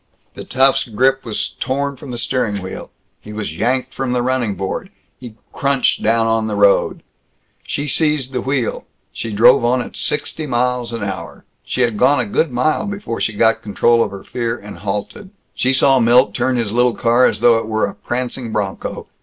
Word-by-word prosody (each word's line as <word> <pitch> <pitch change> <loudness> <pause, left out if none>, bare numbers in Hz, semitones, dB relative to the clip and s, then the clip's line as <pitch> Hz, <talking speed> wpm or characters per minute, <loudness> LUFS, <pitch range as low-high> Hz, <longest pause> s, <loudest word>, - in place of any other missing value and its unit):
The - - -8
tough's 135 +1 +2
grip 130 +4 +1
was 110 -3 -3
torn 140 +1 -1
from 135 +1 -11
the 120 - -5
steering 115 -3 -1
wheel. 95 - -7 0.3
He 105 - -11
was 105 -7 -5
yanked 125 +7 -1
from 130 -2 -2
the 125 -1 0
running 125 -5 0
board. 95 -1 -4 0.3
He 120 -4 -10 0.2
crunched 140 -2 +1
down 115 +1 +2
on 115 -1 +1
the 105 - -2
road. 100 -1 +3 0.6
She 145 - -4
seized 150 -3 +1
the 125 -2 -2
wheel. 130 -3 -2 0.3
She 115 - -5
drove 120 +5 +5
on 125 +2 +2
at 120 - -6
sixty 150 +1 -2
miles 125 -1 0
an 115 -2 -4
hour. 100 -1 -6 0.2
She 125 - -2
had 115 -4 +1
gone 145 +6 +4
a 125 - 0
good 155 +10 0
mile 140 +10 0
before 200 - -5
she 110 - 0
got 115 +2 +2
control 115 +3 +2
of - - -3
her 100 0 -9
fear 120 -1 -3
and 105 -2 -11
halted. 105 - -5 0.2
She 130 - +1
saw 135 0 +4
Milt 120 +2 +4
turn 130 0 0
his 115 -4 -1
little 120 +1 +2
car 120 +1 +4
as - - -2
though 115 -1 +5
it 110 - -6
were 110 0 +1
a - - -5
prancing 125 -1 -4
bronco. 100 -3 -3
120 Hz, 195 wpm, -18 LUFS, 110-130 Hz, 0.6 s, drove